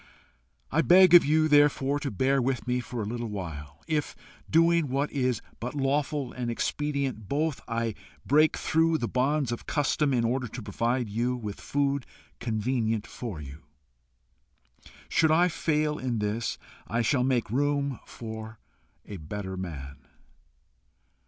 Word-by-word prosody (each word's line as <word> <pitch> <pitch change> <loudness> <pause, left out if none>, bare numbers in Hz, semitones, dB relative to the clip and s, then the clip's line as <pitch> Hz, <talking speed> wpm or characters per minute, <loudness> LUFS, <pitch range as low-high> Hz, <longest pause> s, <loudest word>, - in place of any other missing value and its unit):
I - - +3
beg 185 0 +7
of 175 - +10
you, 155 +2 +3
therefore, 145 -1 +4
to 140 - -3
bear 135 +5 +1
with 130 0 -1
me 125 0 +1
for 120 -2 -4
a - - -4
little 120 +2 -3
while, 80 -7 -7
if, 150 -2 -1 0.3
doing 165 -1 +4
what 140 +3 0
is 130 -4 0 0.2
but 125 +5 -5
lawful 140 -1 -1
and 125 -2 -3
expedient 135 -3 -2
both, 150 0 -1
I 115 -1 -1 0.3
break 155 +3 +4
through 165 0 +2
the 120 - -2
bonds 135 +1 +1
of 120 - -5
custom 145 0 +1
in 120 -3 +2
order 125 +2 0
to 120 +3 -7
provide 115 +4 -1
you 120 +4 -1
with 105 -5 -6
food 140 -2 -1 0.3
convenient 115 -1 -1
for 110 -10 -6
you. 70 +1 -9 1.5
Should 160 - +3
I 175 +3 +4
fail 150 -2 0
in 125 -2 -2
this, 105 +2 -2 0.3
I 115 +1 0
shall 125 +2 +2
make 125 -5 0
room 140 0 0
for 110 -1 -8 0.5
a 100 - -7
better 95 +4 -6
man. 75 -7 -6
125 Hz, 145 wpm, -28 LUFS, 110-145 Hz, 1.5 s, of